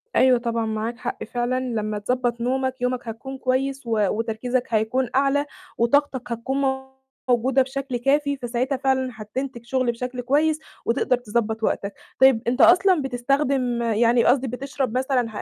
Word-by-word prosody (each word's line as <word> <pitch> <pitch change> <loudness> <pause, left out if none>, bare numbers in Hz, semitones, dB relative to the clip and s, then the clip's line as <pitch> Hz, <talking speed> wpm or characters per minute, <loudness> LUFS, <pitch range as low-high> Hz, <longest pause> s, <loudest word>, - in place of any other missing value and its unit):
أيوه 255 -1 +5
طبعًا 230 -1 -1
معاك 220 +2 -3
حق 250 0 -5
فعلًا، 245 +1 -1
لما 215 -4 -2
تضبط 240 +1 -1
نومك، 260 +1 -1
يومك 250 -1 -1
هيكون 265 +4 -6
كويس 265 +1 -1
و 225 -1 0
وتركيزك 230 +3 -1
هيكون 225 +3 +1
أعلى 280 +1 +2 0.3
وطاقتك 260 0 +1
هتكون 250 +4 -2 0.7
موجودة 255 +2 +3
بشكل 265 -1 -3
كافي، 280 +3 +1
فساعتها 250 +2 -2
فعلًا 265 -1 +1
هتنتج 235 +3 -6
شغل 255 -1 +1
بشكل 250 +1 -5
كويس 300 +5 +2 0.3
وتقدر 245 +1 +1
تضبط 225 -1 -2
وقتك. 200 -1 -1 0.3
طيب 265 -4 +6
أنت 250 +3 +1
أصلًا 360 -2 +6
بتستخدم 255 -1 0
يعني 235 +1 +3
قصدي 265 +1 +3
بتشرب 260 0 -3
مثلًا 255 -2 +1
250 Hz, 145 wpm, -23 LUFS, 235-270 Hz, 0.7 s, طيب